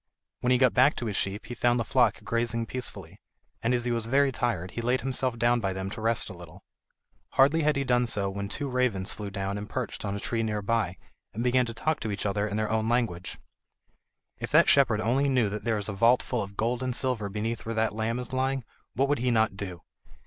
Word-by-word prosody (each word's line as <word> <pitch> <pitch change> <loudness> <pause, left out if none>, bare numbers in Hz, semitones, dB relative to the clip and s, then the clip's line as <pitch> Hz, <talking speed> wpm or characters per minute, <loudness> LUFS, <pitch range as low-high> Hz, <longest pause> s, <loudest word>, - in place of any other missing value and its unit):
When 125 - 0
he 125 - +5
got 130 -1 +4
back 130 +4 +5
to 120 - -4
his 105 -3 -2
sheep 100 +1 -2
he 120 - -6
found 120 +1 +2
the - - +1
flock 115 -2 +2
grazing 115 +1 -1
peacefully, 125 +2 -7 0.4
and 115 - +1
as 120 -1 +1
he 120 - 0
was 115 -1 0
very 135 +2 +3
tired 110 -9 -2
he 115 - -4
laid 125 +2 +1
himself 130 -2 -1
down 120 +1 +3
by 95 -4 -1
them 95 +1 -4
to 110 - -6
rest 115 0 +2
a 100 - -7
little. 90 +1 -13 0.7
Hardly 145 +5 +4
had 150 0 +2
he 140 - 0
done 125 -1 +2
so 100 -3 0
when 100 +1 -4
two 145 +5 -3
ravens 125 -7 0
flew 105 -1 -6
down 100 0 -3
and 105 +1 -7
perched 125 -5 -4
on 100 -1 -2
a - - -4
tree 115 +2 -2
near 105 -2 -2
by, 100 -4 0 0.4
and 115 - -2
began 125 0 +3
to 115 - -5
talk 155 +6 0
to 110 - -4
each 100 0 -3
other 100 +1 0
in 105 0 -3
their 110 0 -1
own 110 0 +1
language: 110 -7 -1 1.0
"If - - -4
that - - +6
shepherd 120 -6 +4
only 130 +6 +2
knew 125 -6 +2
that 105 +1 -5
there 115 -2 +1
is 105 - -3
a 110 - -3
vault 115 +5 +4
full 125 -3 -2
of 100 0 -7
gold 120 +2 0
and 130 -1 -2
silver 125 -7 0
beneath 110 +3 -3
where 115 - -2
that 110 -1 +1
lamb 110 +2 -1
is 125 0 -6
lying, 130 0 0 0.3
what 135 +3 +2
would 145 -1 +1
he 125 +1 +1
not 110 -3 +2
do?" 90 -3 -6
115 Hz, 245 wpm, -28 LUFS, 105-125 Hz, 1.0 s, that